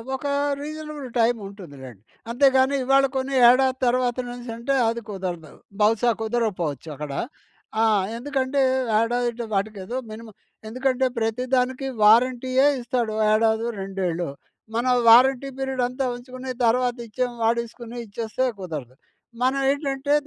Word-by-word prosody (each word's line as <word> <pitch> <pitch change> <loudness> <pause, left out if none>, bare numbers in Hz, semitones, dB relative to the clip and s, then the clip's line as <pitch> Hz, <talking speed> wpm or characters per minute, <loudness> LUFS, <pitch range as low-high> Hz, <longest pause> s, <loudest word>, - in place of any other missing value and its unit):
ఒక 265 - -8 0.4
reasonable 305 -2 -6
time 230 +1 +3
ఉంటుంది 195 -7 -11
లెండి. 120 -7 -11 0.3
అంతేకాని 265 +1 +4
ఇవాళ 270 +1 +4
కొన్ని 265 +1 -1
ఏడాది 260 +1 +3
తర్వాతనేసంటే 245 0 -1
అది 230 +1 -1
కుదరదు, 180 -6 -5 0.3
బహుశా 225 +3 +3
కుదరకపోవచ్చు 205 - -2
అక్కడ. 145 0 -6 0.7
ఆ! - - +5 0.3
ఎందుకంటే, 270 +1 -1 0.4
ఏడాది 240 +1 -1
వాటికే 200 +1 -2
ఏదో 245 +6 -4
మినిమమ్ 220 -1 -10 0.3
ఎందుకంటే 255 +3 0
ప్రతి 225 +2 -1
దానికి 260 +1 0 0.2
వారంటీయే 255 +4 +4
ఇస్తాడు. 240 -2 -2 0.2
ఏడాదో, 220 +1 +2
రెండేళ్ళో. 185 -4 -3 0.5
మనం 250 +2 +2 0.2
వారంటీ 260 +3 +6
పీరియడ్ 265 -1 -2
అంతా 255 +2 -3
ఉంచుకొని 255 +1 -9 0.2
తర్వాత 245 +1 +2
ఇచ్చే 250 +3 -1 0.2
వాడుకొని 235 +1 -2
ఇచ్చేస్తే 225 +4 -3
కుదరదు. 150 -9 -6 0.5
మనం 260 +2 +2
ఏంటంటే 280 0 -1
245 Hz, 120 wpm, -23 LUFS, 220-260 Hz, 0.7 s, వారంటీ